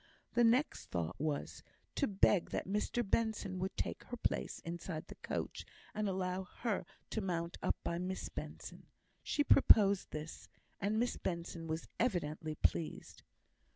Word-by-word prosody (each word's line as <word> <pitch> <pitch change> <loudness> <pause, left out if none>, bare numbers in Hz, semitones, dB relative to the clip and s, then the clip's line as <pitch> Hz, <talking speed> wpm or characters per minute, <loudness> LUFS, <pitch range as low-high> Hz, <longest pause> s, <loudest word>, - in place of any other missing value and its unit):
The 240 - +5
next 245 +6 +3
thought 85 -1 -2
was, 150 -1 -2 0.3
to 280 - +1
beg 195 -2 +4
that - - -2
Mr 210 +3 0
Benson 210 -3 0
would 190 +1 -2
take - - -2
her 245 - -5
place - - -1
inside 170 -1 -4
the - - -9
coach, - - -3 0.3
and 210 -1 0
allow 185 0 -1 0.2
her 210 -7 0 0.2
to 220 - 0
mount 170 -2 -2
up - - +2
by 170 - -1
Miss 185 +1 -2
Benson. - - -7 0.3
She 290 - +1
proposed 200 -9 +6
this, 155 +1 -6 0.3
and 205 +2 +1
Miss 240 +2 +1
Benson 170 -1 -3
was 160 +1 -3
evidently 160 -8 0
pleased. 160 +1 -1
185 Hz, 150 wpm, -36 LUFS, 165-215 Hz, 0.3 s, proposed